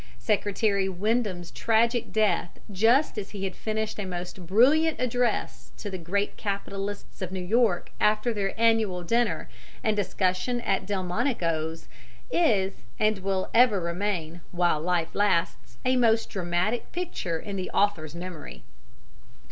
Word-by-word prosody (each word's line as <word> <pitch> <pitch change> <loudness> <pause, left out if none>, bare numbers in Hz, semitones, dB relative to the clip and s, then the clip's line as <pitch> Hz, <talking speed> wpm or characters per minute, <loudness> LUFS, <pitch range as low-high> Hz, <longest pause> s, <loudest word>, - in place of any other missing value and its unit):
Secretary 200 - +1
Windom's 190 -2 -1
tragic 230 +1 +1
death 210 -6 +1
just 225 +6 +3
as 200 - -6
he 200 -2 -6
had 190 -2 -3
finished 220 0 -3
a - - -1
most 180 -1 -6
brilliant 285 - +4
address 245 -2 -1
to 205 - -6
the 190 - -3
great 200 +5 -1
capitalists 200 0 -4
of 185 -1 -3
New 190 - -3
York 215 -1 +2
after 215 +3 +3
their 200 0 -2
annual 220 -6 +2
dinner 235 +6 0 0.4
and 220 -2 +2
discussion 190 +4 0
at 190 - -1
Delmonico's 180 - -1 0.4
is, 200 - +2 0.2
and 215 -1 +2
will 190 0 -2
ever 230 -4 +5
remain, 170 -1 -2
while 175 -3 +1
life 170 -1 0
lasts, 165 - 0
a 255 0 +3
most 230 -2 +3
dramatic 185 +5 -1
picture 325 - -3
in 200 +2 -6
the 185 -1 -3
author's 170 -7 0
memory. 170 - -8
200 Hz, 135 wpm, -27 LUFS, 180-225 Hz, 0.4 s, ever